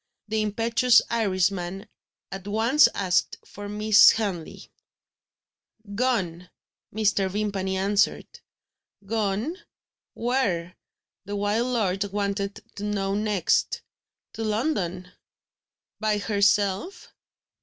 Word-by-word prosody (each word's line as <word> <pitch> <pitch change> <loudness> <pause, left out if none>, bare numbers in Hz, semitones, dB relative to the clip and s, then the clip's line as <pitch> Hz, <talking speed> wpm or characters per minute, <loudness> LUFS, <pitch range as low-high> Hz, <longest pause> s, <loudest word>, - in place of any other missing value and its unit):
The 220 0 0
impetuous 230 +3 +3
Irishman 195 -2 -1 0.4
at 195 0 -7
once 230 +8 +4
asked 185 -2 0
for 205 0 -9
Miss 210 0 +6
Henley. 195 -7 -3 1.2
"Gone," 195 -7 -1 0.4
Mr. 200 -2 +1
Vimpany 195 -1 -2
answered 200 +1 +1 0.8
"Gone 220 - -1 0.6
where?" 200 -9 -1 0.5
the 205 +1 -5
wild 205 +4 0
lord 205 -6 0
wanted 200 0 -3
to 200 - -6
know 200 -2 -1
next. 205 -4 0 0.5
"To 225 - -5
London." 205 - -2 0.9
"By 215 -1 +1
herself?" 205 - 0
205 Hz, 90 wpm, -25 LUFS, 195-220 Hz, 1.2 s, Miss